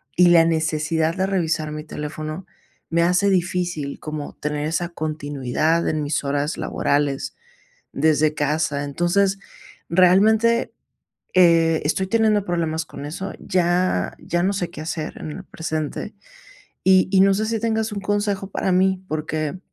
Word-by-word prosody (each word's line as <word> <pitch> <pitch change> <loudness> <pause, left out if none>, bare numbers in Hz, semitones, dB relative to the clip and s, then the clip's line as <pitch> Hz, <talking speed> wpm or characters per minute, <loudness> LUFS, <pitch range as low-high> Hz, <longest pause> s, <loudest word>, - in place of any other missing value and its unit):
y 180 0 +6
la 170 -1 +7
necesidad 160 0 0
de 190 0 0
revisar 160 -5 -1
mi 150 0 -5
teléfono 155 +3 -6 0.4
me 170 0 +2
hace 180 +3 +3
difícil, 175 -5 -1
como 155 -1 -6
tener 150 0 -3
esa 170 +2 -1
continuidad 155 0 -1
en 155 -1 0
mis 145 0 -1
horas 145 +2 -1
laborales 140 -1 -1 0.6
desde 155 -1 +2
casa. 150 -1 0
Entonces, 185 +6 +1 0.5
realmente 215 +7 +4 0.6
eh, 165 -3 +4
estoy 175 +5 +1
teniendo 215 -1 +2
problemas 165 -2 -1
con 145 - -9
eso. 190 +6 -5
Ya 175 - 0
ya 175 +1 -1
no 195 +2 +1
sé 180 -4 -2
qué 165 -3 -9
hacer 160 -1 -4
en 155 - -6
el - - -8
presente. 155 -2 -4 0.7
Y 185 0 +5
y 195 - +4
no 195 0 +5
sé, 215 +3 0
si 225 0 -1
tengas 220 0 -1
un 205 - -4
consejo 205 -1 -1
para 190 - -1
mí, 190 +1 +2
porque, 155 +1 -3
170 Hz, 145 wpm, -22 LUFS, 155-190 Hz, 0.7 s, la